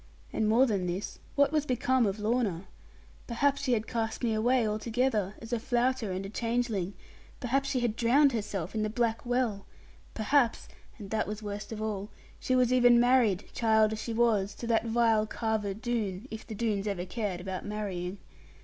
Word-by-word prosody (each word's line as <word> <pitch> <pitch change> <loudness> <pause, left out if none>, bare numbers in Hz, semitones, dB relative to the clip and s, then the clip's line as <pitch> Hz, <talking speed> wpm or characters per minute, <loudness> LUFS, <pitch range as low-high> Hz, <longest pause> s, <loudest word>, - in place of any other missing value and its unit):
And 215 -1 +1
more 240 +4 +5
than 200 -7 -1
this, 180 +3 -4 0.2
what 285 0 +4
was 305 -1 0
become 250 -1 +2
of 195 +1 -2
Lorna? 210 -5 0 0.6
Perhaps 275 +4 +1
she 260 -3 +1
had 220 -2 0
cast 225 +1 -3
me 230 -2 +2
away 235 +2 +2
altogether, 215 -1 0
as 225 +2 -7
a 235 - +1
flouter 245 -2 0
and 185 +1 -3
a - - -6
changeling; 230 -4 -1 0.4
perhaps 275 +2 0
she 260 -3 0
had 235 -3 0
drowned 270 +5 +4
herself 205 -6 -3
in 220 - -1
the 215 - 0
black 230 0 0
well; 240 -5 0 0.5
perhaps 235 +2 +2 0.3
(and 205 -3 -9
that 220 -1 0
was 210 +1 -5
worst 205 +1 -6
of 215 -1 -4
all) 205 -1 -3 0.3
she 255 - 0
was 250 -1 +3
even 245 -1 +6
married, 240 -6 +3
child 220 -1 +3
as 215 - -4
she 230 - -4
was, 220 -4 +1
to - - -7
that 230 0 +1
vile 225 -2 +3
Carver 220 -3 -2
Doone, 220 -2 -3
if 220 0 -7
the 220 - -6
Doones 210 -2 -1
ever 190 -3 -2
cared 200 -2 -3
about 185 0 -5
marrying! 200 -3 -4
220 Hz, 185 wpm, -29 LUFS, 205-245 Hz, 0.6 s, even